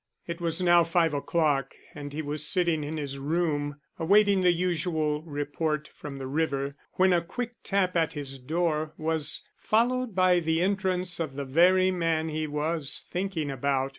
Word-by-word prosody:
It 170 0 -6
was 170 +2 0
now 175 -1 +6
five 165 -1 +2
o'clock 145 -2 0 0.2
and 145 -1 -7
he 155 +2 -4
was 150 0 -3
sitting 170 -1 +2
in 155 +2 -4
his 140 -2 -4
room 145 -1 -1 0.2
awaiting 200 +3 +4
the 180 -1 +5
usual 165 -3 0
report 150 0 -3
from 145 -2 -8
the 135 - -6
river, 140 -1 -1 0.2
when 185 0 +4
a 175 - +3
quick 245 +8 -5
tap 190 -2 +1
at 165 -2 +1
his 135 -2 -5
door 155 +2 -1
was 160 -1 0 0.2
followed 240 0 +1
by 185 -1 +4
the 160 -1 0
entrance 185 -2 0
of 155 -5 -3
the 140 0 -4
very 185 +7 +4
man 165 -3 0
he 155 0 -2
was 150 0 -1
thinking 180 -6 -2
about. 135 0 0
160 Hz, 165 wpm, -27 LUFS, 145-180 Hz, 0.2 s, now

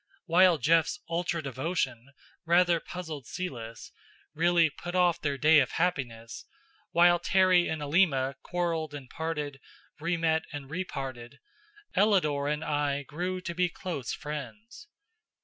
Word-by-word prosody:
While 180 0 +5
Jeff's 160 +4 +2
ultra 170 -1 -2
devotion 135 -3 -2 0.3
rather 170 0 +4
puzzled 160 -8 -7
Celis, 115 -11 -6 0.4
really 170 +1 +4
put 175 +4 -7
off 180 -2 +3
their 140 -2 -1
day 155 +2 +6
of 135 - 0
happiness, 125 -10 -2 0.5
while 175 0 +5
Terry 185 -1 +4
and 160 -2 -3
Alima 140 -4 +2
quarreled 165 -4 -2
and 140 -3 -8
parted, 150 -4 -4 0.4
re 170 +2 -1
met 160 -1 +1
and 140 -1 -8
re 180 +4 -2
parted, 130 -5 -7 0.6
Ellador 165 -9 +2
and 150 +1 -2
I 145 -1 -1
grew 180 +6 -4
to 175 -1 -5
be 180 +1 +1
close 170 - -5
friends. 150 - -7
160 Hz, 130 wpm, -29 LUFS, 140-175 Hz, 0.6 s, day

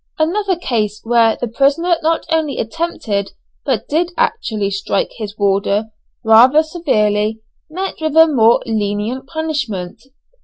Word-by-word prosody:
Another 375 +5 0
case, 215 - -2
where 230 -1 +3
the 245 - -2
prisoner 285 +9 +2
not 325 +1 0
only 315 -3 0
attempted 225 - -3 0.3
but 255 -7 -2
did 335 +4 0
actually 215 - -1
strike 195 0 -1
his 215 -2 -7
warder 200 +2 0 0.3
rather 245 +8 +6
severely, 220 - 0 0.3
met 370 +2 -5
with 315 0 -1
a 325 - +9
more 235 -7 +3
lenient 220 +4 -2
punishment. 270 - -4
240 Hz, 125 wpm, -17 LUFS, 210-315 Hz, 0.3 s, a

